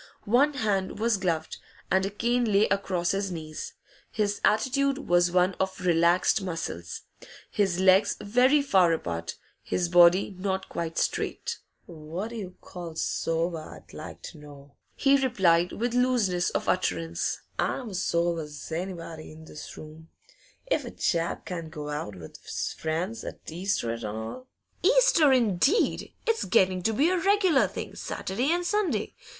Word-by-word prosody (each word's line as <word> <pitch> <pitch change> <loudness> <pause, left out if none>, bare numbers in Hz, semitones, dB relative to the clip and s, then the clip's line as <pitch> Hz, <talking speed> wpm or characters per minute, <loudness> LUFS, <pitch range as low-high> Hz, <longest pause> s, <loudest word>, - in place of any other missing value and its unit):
One 265 +8 +4
hand 205 -7 -1
was 225 0 +1
gloved, 165 -4 -2 0.3
and 190 0 +3
a 195 - -1
cane 235 +2 0
lay 200 +2 +4
across 185 -3 0
his 195 0 -1
knees. 155 -2 -6 0.4
His 205 -2 -1
attitude 265 +5 +2
was 175 0 +3
one 180 +1 +3
of 190 0 -1
relaxed 175 +2 +3
muscles, 165 - -5 0.5
his 190 -4 +1
legs 190 +2 +4
very 255 +7 +3
far 185 -10 +4
apart, 85 - -4 0.3
his 175 -1 -1
body 175 +3 +5
not 190 0 -2
quite 165 -1 -4
straight. 470 - -2 0.3
'What 170 +5 -6
d' 235 - -7
you 185 -4 -7
call 170 -3 -8
sober, 165 +1 -1
I'd - - -13
like - - -9
to - - -9
know?' 145 -1 -14 0.2
he 275 -1 +3
replied, 180 -8 +3
with 240 +2 -2
looseness 240 -8 +2
of - - -3
utterance. 85 -1 -1 0.2
'I'm 245 -5 -1
as 185 -1 -2
sober 170 -2 0
's 150 +2 -10
anybody 165 -2 -5
in 160 +1 -13
this 150 - -10
room. 155 +1 -12 0.6
If - - 0
a - - -6
chap 170 -1 -1
can't 170 -3 -5
go 150 -1 -7
out 145 -9 -4
with 80 -3 -11
's - - -3
friends 170 +8 -3
't - - -8
Easter 175 - -1
an' 115 0 -5
all 110 - -6 0.2
?' - - -42
'Easter, 390 - +5
indeed! 250 - +2
It's 455 -1 +1
getting 185 0 +3
to 220 +5 +1
be 295 +10 +3
a 370 - +1
regular 380 -6 +3
thing, - - -7
Saturday 245 +11 -2
and 350 +1 0
Sunday. 415 +1 0
185 Hz, 155 wpm, -27 LUFS, 165-235 Hz, 0.6 s, body